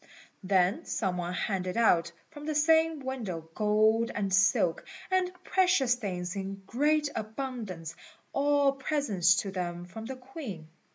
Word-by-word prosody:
Then 190 - +2
some 190 -4 -1
one 175 0 -3
handed 185 -1 -2
out 170 -7 +3 0.2
from 295 -1 -9
the 310 - -1
same 320 0 +3
window 220 -12 -5
gold 215 +2 +3
and 195 -2 -1
silk, 190 -3 +3 0.3
and 370 -1 +2
precious 360 -10 +3
things 185 -6 -4
in 195 0 -5
great 295 +6 +2
abundance, 215 - -5 0.4
all 285 0 +3
presents 265 - +2
to 195 - -5
them 175 -2 -4
from 220 +5 -9
the 265 - -5
Queen. 250 - -8
220 Hz, 135 wpm, -29 LUFS, 185-275 Hz, 0.4 s, out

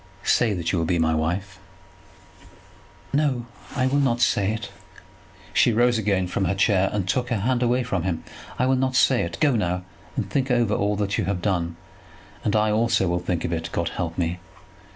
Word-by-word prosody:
"Say 115 -3 +3
that 85 -2 -2
you 90 - 0
will 80 - 0
be 90 - +1
my 80 -1 +2
wife." 90 +5 -2 1.5
"No, 140 -5 +1 0.3
I 130 -2 +1
will 135 +2 +2
not 125 -4 +1
say 105 -4 +2
it." 110 0 -5 0.8
She 150 -6 +4
rose 120 +1 +3
again 100 -3 +1
from 95 +2 -1
her 95 +2 0
chair, 95 -1 +3
and 100 -3 -2
took 125 +6 0
her 115 -5 -1
hand 125 +3 +1
away 125 +1 +2
from 100 -7 -1
him. 85 -2 -2 0.3
"I 125 - +2
will 130 +1 +3
not 130 0 0
say 130 -1 +4
it. 85 0 -4
Go 145 -5 +3
now 90 -4 -1 0.3
and - - -2
think 135 -1 -1
over 120 -4 +2
all 105 0 +1
that 100 0 -1
you - - 0
have 95 -1 -1
done; 85 -4 -1 0.7
and 105 - +1
I 105 0 +3
also 110 -2 +2
will 85 0 0
think 90 -1 -2
of 85 - -2
it. 80 0 -3
God 85 -1 -1
help 85 -2 -4
me. 90 0 -1
100 Hz, 205 wpm, -24 LUFS, 90-120 Hz, 1.5 s, She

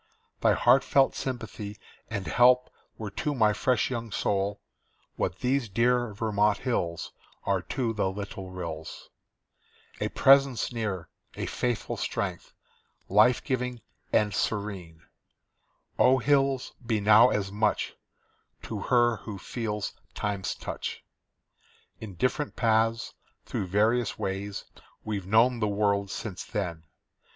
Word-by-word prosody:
Thy - - +4
heartfelt 135 +2 +4
sympathy 110 -5 -5 0.3
and 100 -4 -3
help 125 +8 +4 0.3
were 105 -3 -5
to 145 +6 -2
my 110 -4 +4
fresh 125 +3 +1
young 115 -2 -4
soul 100 +1 0 0.6
What 90 - -2
these 125 -2 +1
dear 120 +3 +2
Vermont 105 -1 +2
hills 85 -11 -2 0.3
Are 95 -2 +1
to 120 +2 -2
the 105 -3 0
little 95 -1 -6
rills; 85 -4 -7 0.9
A - - -1
presence 135 -3 +4
near, 100 -7 -3 0.3
a - - -3
faithful 120 -2 -2
strength, - - -3 0.6
life 110 +5 +5
giving 125 -2 -2 0.3
and 105 -2 +2
serene 95 -6 -3 1.0
Oh, 130 +1 +6
hills, 135 0 +1
be 115 -2 0
now 110 +4 +7
as 100 -4 -1
much 105 +1 0 0.7
To 110 - -5
her 120 +1 +3
who 105 0 -7
feels 105 0 -4 0.2
Time's 100 -2 -2
touch! - - -5 1.0
In 105 -4 -8
different 130 - -1
paths, 115 0 +1 0.3
through 95 - -3
various 110 +5 +2
ways, 100 +1 -4 0.4
we've 100 -4 -4
known 115 +4 +4
the 105 - +1
world 100 -1 +1
since 100 -2 -5
then. 85 -7 -4
110 Hz, 120 wpm, -28 LUFS, 100-120 Hz, 1.0 s, now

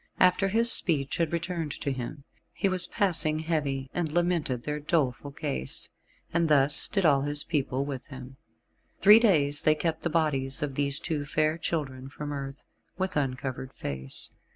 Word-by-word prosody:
After 185 +2 +4
his 230 +4 +5
speech 140 -6 +3
had 165 -2 0
returned 170 -2 -3
to 140 - -2
him, 130 +2 -6 0.3
he - - 0
was 185 -2 +5
passing 165 -6 +1
heavy, 150 -4 -2
and 170 -4 -2
lamented 170 -7 0
their 150 +2 -3
doleful 145 -4 -1
case, 65 - -4 0.4
and 165 -1 +1
thus 145 0 +4
did 195 -3 -1
all 140 -3 +4
his 145 +1 -1
people 140 -4 -1
with 135 -4 -6
him. 130 -1 -11 0.6
Three 210 +3 +8
days 145 -10 +3
they 155 - +3
kept 160 +1 -2
the 170 - -1
bodies 150 -4 -1
of 145 -2 -3
these 140 0 0
two 150 -1 -3
fair 155 +2 0
children 135 -6 -4
from 145 +1 -7
earth, 135 0 -7 0.3
with 190 -1 -2
uncovered 130 -1 -3
face. 65 -1 -6
150 Hz, 165 wpm, -27 LUFS, 135-170 Hz, 0.6 s, Three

